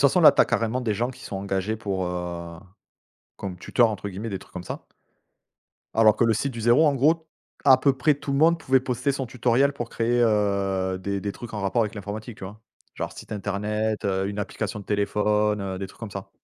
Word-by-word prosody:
façon, 145 +6 +5
là, 160 - +9
tu - - +3
as - - +7
carrément 115 +3 0
des 115 -4 0
gens 120 +5 -1
qui 130 - -13
sont 100 - -5
engagés 95 +2 -2
pour, 100 -3 -2
heu, 85 -1 -5 0.8
comme 95 -3 -5
«tuteur», 120 +3 +3
entre 100 -1 -4
guillemets, 100 +4 -6
des 95 - -3
trucs - - -17
comme 90 - -7
ça - - -6 1.1
alors 110 -1 +5
que 120 - +3
Le 115 - +4
Site 135 +5 -1
du 115 - -6
0, 120 +8 +5
en 145 - +3
gros, 160 +5 +2 0.4
à 130 -2 +7
peu 140 +1 +3
près 150 +3 +3
tout 140 0 -5
le 140 - +1
monde 165 +3 +5
pouvait 130 -4 +3
poster 125 +2 -1
son 135 -1 -3
tutoriel 125 +3 +2
pour 120 -4 -5
créer, 120 +1 0
heu, 100 -4 +1
des 100 +1 -3
des 100 +1 -3
trucs 115 +1 -9
en 105 - -3
rapport 100 +4 +1
avec 110 0 -3
l'informatique, 105 +3 -6
tu - - -7
vois? 105 +3 -9 0.3
Genre - - -4
site - - -10
internet, 105 +2 -2
heu, 95 -1 0
une 100 0 -5
application 105 0 -3
de 100 - -11
téléphone, 105 +1 +1
heu, 95 -1 -4
des 95 - -4
trucs 95 - -18
comme 110 -3 -6
ça. 100 0 -7
105 Hz, 230 wpm, -25 LUFS, 100-125 Hz, 1.1 s, là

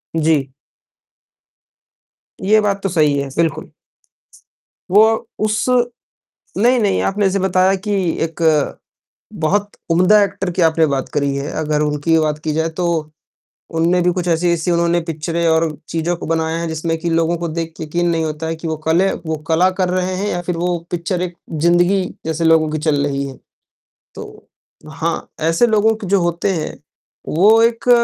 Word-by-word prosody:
जी। 150 -4 +1 1.9
ये 215 +3 +4
बात 200 -1 -1
तो 195 - 0
सही 150 -4 +2
है, 140 - -3
बिल्कुल। 165 -2 -1 1.2
वो 210 +3 +7 0.4
उस 215 0 0 0.9
नहीं-नहीं 230 -2 +2
आपने 205 +1 0
ऐसे 195 +1 +1
बताया 190 0 +2
कि - - 0 0.3
एक 165 0 -5 1.0
बहुत 205 +6 +1 0.2
उम्दा 185 +5 +5
एक्टर 195 -1 -3
की 175 - -2
आपने 160 -1 +4
बात 135 -1 -2
करी 140 -2 0
है। 140 +2 -4
अगर 150 0 0
उनकी 150 +2 +1
बात 155 -1 -1
की 155 - -1
जाए 160 +1 0
तो 175 - +1 0.9
उन्होंने 175 +2 +2
भी 180 - +2
कुछ 180 -1 -3
ऐसी-ऐसी 170 0 +1
उन्होंने 170 0 +2
पिक्चरें 165 +2 -2
और 160 0 +2 0.2
चीज़ें 165 +1 -1
बनाए 160 0 -1
हैं, 170 - -3
जिसमें 165 +1 -2
कि 170 +1 -2
लोगों 165 +1 +1
को 170 - -3
देखकर 165 0 -5
यक़ीन 170 +3 -1
नहीं 165 -1 0
होता 155 +1 -4
है 165 - -2
कि 165 +1 -7
वो 160 -1 -2
कले 180 +4 +3
वो 160 0 -1
कला 170 +3 +3
कर 185 -1 +2
रहे 185 0 -1
हैं 200 +3 -2
या 175 -2 -2
फ़िर 175 -1 -3
वो 175 +1 0
पिक्चर 175 +1 -2
एक 180 -1 -4 0.2
ज़िंदगी 175 +4 +2 0.2
जैसे 160 +1 -2
लोगों 160 -1 +4
की 155 - -1
चल 150 -2 +1
रही 140 -1 -2
है। 130 - -11 0.8
तो - - -11 0.4
हाँ, 160 +1 -3
ऐसे 165 +8 +2
लोग 220 0 +2
जो 195 +1 +2
होते 175 +2 0
हैं, 160 -4 -4 0.5
वो 210 +8 +4
एक 235 +3 0
170 Hz, 165 wpm, -18 LUFS, 160-185 Hz, 1.9 s, वो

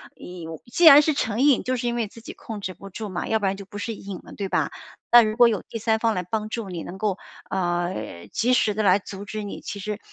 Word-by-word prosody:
你， 180 -2 -9 0.3
既 345 - +3
然 295 -2 +11
是 310 +1 +1
成 225 -4 -1
瘾， 280 -3 +4
就 255 - 0
是 245 - -3
因 240 - -1
为 235 -2 -1
自 230 +3 -14
己 - - -9
控 220 -3 -8
制 185 -1 -4
不 195 +3 -11
住 215 +2 -6
嘛， 180 -2 -4
要 220 - +1
不 205 - -2
然 195 0 0
就 200 - -9
不 205 - -10
是 225 +3 -3
瘾 195 -3 -8
了， - - -13
对 200 - -4
吧？ - - 0 0.4
那 240 - +10
如 215 -1 0
果 240 0 +7
有 210 -5 -1
第 - - -4
三 220 0 +1
方 225 -1 +1
来 180 - -1
帮 215 +4 -3
助 220 -3 -4
你 175 -2 -5
能 185 - -8
够， 200 -1 -1 0.3
呃， 175 - -2
及 245 +2 +1
时 215 -4 +3
地 215 - -1
来 190 -1 +5
阻 200 0 -9
止 215 +1 -5
你， 200 - -6
其 200 - -6
实 210 +2 -4
210 Hz, 295 characters per minute, -24 LUFS, 190-230 Hz, 0.4 s, 然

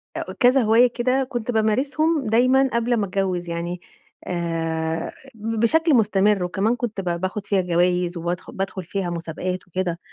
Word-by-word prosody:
أ - - -4
كذا 255 +1 +5
هواية 225 +2 +5
كده 255 +2 0
كنت 240 -2 -3
بامارسهم 275 +7 +1
دايمًا 255 +4 +4
قبل 235 +1 +1
ما 205 - 0
أتجوز 185 -2 -2
يعني 170 +1 -4 0.5
آآ، 165 -2 -2 0.2
ب 225 +1 -3
بشكل 320 +8 +3
مستمر، 205 -4 +3
وكمان 195 +6 0
كنت 230 -5 -3
ب 175 -1 -2
باخد 195 +2 -3
فيها 195 -2 +2
جوايز، 180 0 +1
وبادخل 175 +2 -4
بادخل 195 -1 -4
فيها 180 +1 -3
مسابقات 175 +2 -4
وكده، 180 -1 -2
195 Hz, 155 wpm, -23 LUFS, 175-235 Hz, 0.5 s, كذا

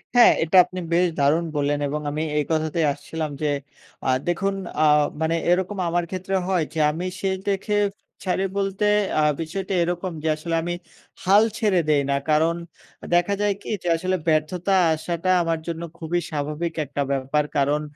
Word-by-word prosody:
হ্যাঁ 245 - +8
এটা 165 +4 +3
আপনি 185 +1 -7
বেশ 175 +2 +4
দারুণ 150 +4 +3
বললেন 145 0 +1
এবং 150 +2 -3
আমি 155 +2 -2
এই 150 - +2
কথাতেই 160 +1 +1
আসছিলাম 160 +2 -5
যে 150 - +1 0.6
আ - - +2 0.2
দেখুন 195 +3 0 0.3
আ - - +5 0.4
মানে 160 +1 +1 0.2
এরকম 190 +3 0
আমার 175 +1 +1
ক্ষেত্রে 190 +1 -3
হয় 185 -3 +2
যে 160 - -3
আমি 170 +4 -4 0.2
শেষ 190 -1 0
দেখে 200 +1 0 0.5
ছাড়ি 190 0 0
বলতে 195 +1 0 0.3
আ - - +4 0.2
বিষয়টা 185 +4 -4
এরকম 175 +2 -2
যে, - - -1
আসলে 165 +2 -3
আমি 175 +1 -2 0.5
হাল 200 +3 +6
ছেড়ে 210 -5 +2
দেই 150 -2 +4
না। 140 - +2
কারণ 160 +2 +3 0.5
আ - - -6
দেখা 175 +3 +2
যায় 205 -1 +2
কি - - -9
যে - - -4
আসলে 185 +3 -1
ব্যর্থতা 165 +5 +1 0.2
আসাটা 170 +3 -3
আমার 165 -1 -1
জন্য 165 -1 -4 0.2
খুবই 170 +1 -1
স্বাভাবিক 150 +3 -3
একটা 140 +1 -3
ব্যাপার। 135 +2 +1
কারণ 145 +2 +2
170 Hz, 175 wpm, -23 LUFS, 155-185 Hz, 0.6 s, হ্যাঁ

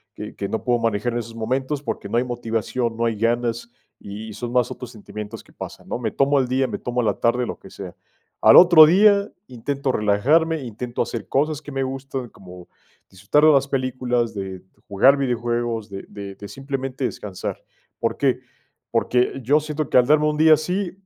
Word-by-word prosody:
que - - -8
que 100 - -4
no 110 - -3
puedo 120 -1 +1
manejar 115 +1 -1
en 120 - -1
esos 115 0 -8
momentos 130 +5 -2
porque 115 -5 -5
no 115 - 0
hay 120 - +2
motivación, 115 -1 -3
no 115 - 0
hay 115 -1 0
ganas 115 +1 -1 0.3
y 105 +2 -8
son 120 +3 -6
más 125 -1 +1
otros 125 -2 -8
sentimientos 105 -1 -9
que - - -23
pasan, - - -9
¿no?, - - -3
me 115 -3 -1
tomo 140 +1 +2
el 130 - 0
día, 130 +1 +1
me - - -5
tomo 125 0 -2
la 110 - -1
tarde, 125 +1 +1
lo - - -6
que 95 - -14
sea, 95 -3 -9 0.5
al - - +7
otro 175 -3 +9
día 200 +4 +4 0.2
intento 135 +3 -3
relajarme, 145 +11 +2
intento 120 +1 -4
hacer 115 -3 -6
cosas 150 +2 0
que 145 - -10
me 135 -1 -1
gustan, 135 -1 -5
como 90 -3 -13 0.4
disfrutar 100 +11 +1
de 155 - +8
las 140 -1 +3
películas, 125 -3 -1
de 95 -2 -6 0.2
jugar 115 +7 +5
videojuegos, 120 -4 -2
de 95 -1 -7
de 100 -1 -8
de 100 - -10
simplemente 135 +2 -4
descansar, 105 -6 -5 0.4
¿por - - -1
qué?, - - +1 0.5
porque 125 +2 +1
yo 145 +5 +3
siento 155 -1 -4
que - - +3
al 125 - +6
darme 150 +3 +3
un 150 - 0
día 160 0 +6
así 180 +4 -2
125 Hz, 195 wpm, -22 LUFS, 110-140 Hz, 0.5 s, otro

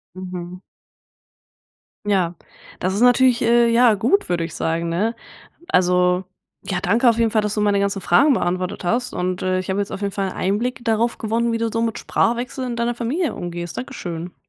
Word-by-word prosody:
Mhm. 180 -1 -7 1.4
Ja, 185 -4 +1 0.4
das 185 +1 -1
ist 200 - -1
natürlich, 245 0 +4
äh, 235 0 +4
ja, 235 0 +5
gut, 240 - +1
würde 175 -2 0
ich 165 -1 -6
sagen, 165 +1 -1
ne? 210 +8 0 0.5
Also, 180 - +2 0.4
ja, 190 -2 -3
danke 225 +7 +3
auf 230 - +3
jeden 230 -2 +2
Fall, 215 - +2
dass 210 0 -2
du 210 - -1
meine 205 -1 +2
ganzen 200 0 -1
Fragen 275 - +4
beantwortet 180 -1 -2
hast 245 +7 0
und, 180 0 -2
äh, 185 0 +1
ich 185 - -5
habe 190 +1 0
jetzt 200 - -3
auf - - -6
jeden 200 -1 -2
Fall 195 -1 -2
Einblick 240 +8 -2
darauf 230 +1 +1
gewonnen, 230 +2 0
wie 230 - -1
du 230 -1 -1
so 230 0 0
mit 225 -1 -1
Sprachwechsel 245 +3 -1
in 240 -1 -4
deiner 235 +1 0
Familie 270 +8 -2
umgehst. 175 -1 -6
Dankeschön. 175 -9 -6
205 Hz, 190 wpm, -21 LUFS, 180-235 Hz, 1.4 s, ja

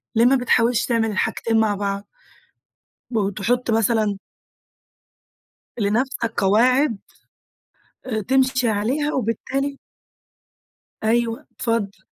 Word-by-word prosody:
ليه 230 +2 +5
ما 270 +2 +5
بتحاولش 240 -2 +2
تعمل 225 -2 +1
الحاجتين 225 +3 0
مع 210 -2 +2
بعض؟ 200 0 -3 1.0
وتحط 220 +3 0
مثلًا 220 -2 +1 1.6
لنفسك 230 +3 0
قواعد، 235 +4 +3 1.1
أ 220 -4 -2
تمشي 260 +1 +2
عليها. 255 +9 0
وبالتالي 270 +4 -2 1.2
أيوه 230 +1 +1
اتفضل. 200 -5 -2
230 Hz, 85 wpm, -22 LUFS, 210-250 Hz, 1.6 s, ليه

